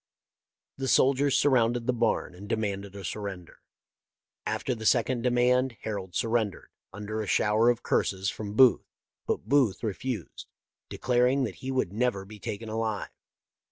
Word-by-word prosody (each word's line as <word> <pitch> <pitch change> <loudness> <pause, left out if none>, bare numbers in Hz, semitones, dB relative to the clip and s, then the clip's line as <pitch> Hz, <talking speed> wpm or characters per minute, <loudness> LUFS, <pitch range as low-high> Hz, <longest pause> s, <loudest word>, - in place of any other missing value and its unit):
The 135 -1 -3
soldiers 135 +1 +3
surrounded 120 -4 +2
the 125 - +1
barn 115 -6 0
and 100 +3 -11
demanded 100 -2 -2
a 100 -2 -7
surrender. 95 -3 -6 0.9
After 130 - -1
the 110 -2 -2
second 120 0 +2
demand 125 0 +2
Harold 95 -5 -5
surrendered, 115 -3 -1 0.2
under 105 +2 -4
a 105 - -5
shower 110 +4 +3
of 120 -1 0
curses 95 0 0
from 105 -1 -6
Booth, 130 0 +5 0.4
but - - -2
Booth 130 -6 +2
refused, 115 +3 -4 0.4
declaring 125 +2 +2
that 120 - -4
he 130 - -5
would 130 -8 -1
never 110 -4 0
be 105 +1 -12
taken 105 +3 -5
alive. 110 -1 -3
115 Hz, 145 wpm, -28 LUFS, 100-125 Hz, 0.9 s, Booth